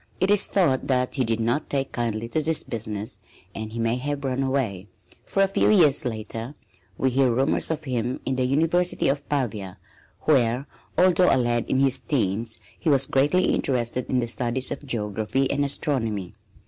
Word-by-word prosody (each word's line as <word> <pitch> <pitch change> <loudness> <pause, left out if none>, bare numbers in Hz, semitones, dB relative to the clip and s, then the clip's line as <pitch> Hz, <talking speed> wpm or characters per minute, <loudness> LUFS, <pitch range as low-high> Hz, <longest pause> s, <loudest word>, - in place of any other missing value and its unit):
It 190 +2 +2
is 205 -1 +3
thought 155 -10 +1
that 125 -1 +1
he 135 - 0
did 115 -1 -1
not 120 +7 -1
take 135 -1 -1
kindly 115 -1 -2
to 155 - 0
this 160 +1 0
business 110 -2 -3 0.3
and 110 0 -6
he 115 - -7
may 115 +1 0
have 145 +2 -3
run 130 0 -1
away, 125 -8 -1 0.4
for 195 - +2
a - - +3
few 195 - +2
years 160 -12 +4
later 115 +3 -4 0.4
we 130 - +1
hear 130 0 +3
rumors 130 +5 +1
of 160 -1 -2
him 125 -2 -2
in 130 - -1
the 130 - 0
University 165 +5 +2
of 140 +1 -2
Pavia, 105 -10 -2 0.4
where, 125 -3 +2 0.3
although 180 0 +5
a - - +4
lad 120 -2 +1
in - - +1
his 135 -1 +3
teens, 110 -3 -1 0.2
he 165 - 0
was 135 -2 +5
greatly 145 +8 +2
interested 125 -1 -1
in 130 - +1
the 120 - -1
studies 120 +3 -1
of - - -5
geography 110 +3 -1
and 145 0 +1
astronomy. 115 - -1
130 Hz, 185 wpm, -24 LUFS, 115-145 Hz, 0.4 s, although